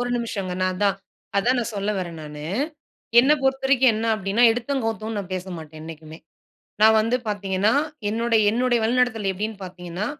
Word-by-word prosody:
1 245 - -1
நிமிஷங்க. 200 -6 -3
நான் 185 - +1
அதான் 200 0 +1 0.4
அதான் 245 +5 +2
நான் 235 -1 -2
சொல்ல 200 +1 -1
வறேன் 170 -3 -5
நானு. 150 0 -8 0.8
என்ன 275 +4 +4
பொறுத்தவரைக்கும் 265 -2 +3
என்ன 220 +1 -2
அப்டின்னா, 205 +3 0
எடுத்தோம், 250 +2 -2
கவுத்தோன் 220 -1 -3
நான் 190 -2 -6
பேசமாட்டேன், 165 -4 -7
என்னைக்குமே. 160 0 -10 0.6
நான் 220 0 +7
வந்து 230 +3 +1
பாத்தீங்கன்னா, 200 0 0 0.4
என்னுடைய 230 0 +2
என்னுடைய 240 +1 +1
வழிநடத்தல் 230 -3 +1
எப்டின்னு 205 +1 -5
பாத்தீங்கன்னா, 180 +2 -6
215 Hz, 155 wpm, -23 LUFS, 185-235 Hz, 0.8 s, நான்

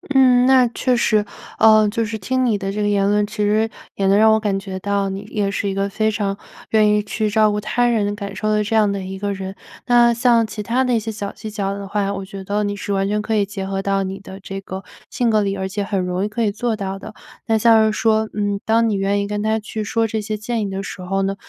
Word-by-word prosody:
嗯， 250 -2 +6
那 260 -1 +6
确 250 +2 0
实。 215 -3 +2 0.3
呃， 215 -1 +6
就 230 +2 -1
是 220 0 -4
听 255 +6 0
你 225 -4 +2
的 195 -1 -3
这 210 +1 -3
个 205 - +1
言 200 -1 +2
论， 210 0 +2
其 215 - -11
实 215 +2 +2 0.3
也 195 - 0
能 195 +1 +4
让 220 +1 +6
我 220 - +3
感 205 -3 -1
觉 190 -1 -6
到 200 0 -1
你 195 +1 -5
也 205 -1 -2
是 200 - -2
一 195 - -1
个 195 +1 -1
非 215 +2 0
常 200 -2 -2 0.3
愿 215 -1 +4
意 210 - +1
去 215 +1 -2
照 215 0 +3
顾 210 - -1
她 215 +4 0
人 210 -4 +1
感 200 -1 -6
受 215 +2 -2
的 210 0 +2
这 215 - -4
样 210 -2 +4
的 200 -1 -2
一 190 +1 -6
个 200 0 -2
人。 190 0 -6 0.3
那 240 -1 +5
像 235 -1 +3
其 215 -1 -6
他 250 +5 +1
的 250 - +1
一 - - +2
些 225 +1 -4
小 205 -2 -5
技 215 -1 -8
巧 200 -1 -2
的 200 0 -6
话， 200 0 -1
我 195 -1 -5
觉 195 0 -9
得 205 +2 -1
你 205 0 -2
是 200 - -3
完 195 0 0
全 210 +1 0
可 220 +1 -1
以 205 -1 +2
结 195 -1 -6
合 195 0 -2
到 195 0 0
你 190 +1 -5
的 190 0 -10
这 195 0 -7
个 190 0 -7 0.3
性 240 -2 0
格 215 -1 +3
里， 200 -1 -1
而 190 0 -2
且 205 +2 -3
很 200 -1 -1
容 180 +1 -1
易 210 - -1
可 230 +2 -2
以 210 - +1
做 230 +2 -2
到 195 -1 -4
的。 215 +2 -10 0.3
那 225 -1 +3
像 225 0 +5
是 215 - +2
说， 220 -1 +2
嗯， 205 -1 -1
当 225 +1 +3
你 - - 0
愿 195 +1 0
意 200 - -3
跟 205 0 -3
她 220 +1 +1
去 215 0 -5
说 225 +2 0
这 220 0 -2
些 215 0 -3
建 225 +2 -3
议 205 - -2
的 195 0 -4
时 195 -1 -7
候 195 +2 -1
呢， 195 +1 -1
210 Hz, 300 characters per minute, -20 LUFS, 195-220 Hz, 0.3 s, 嗯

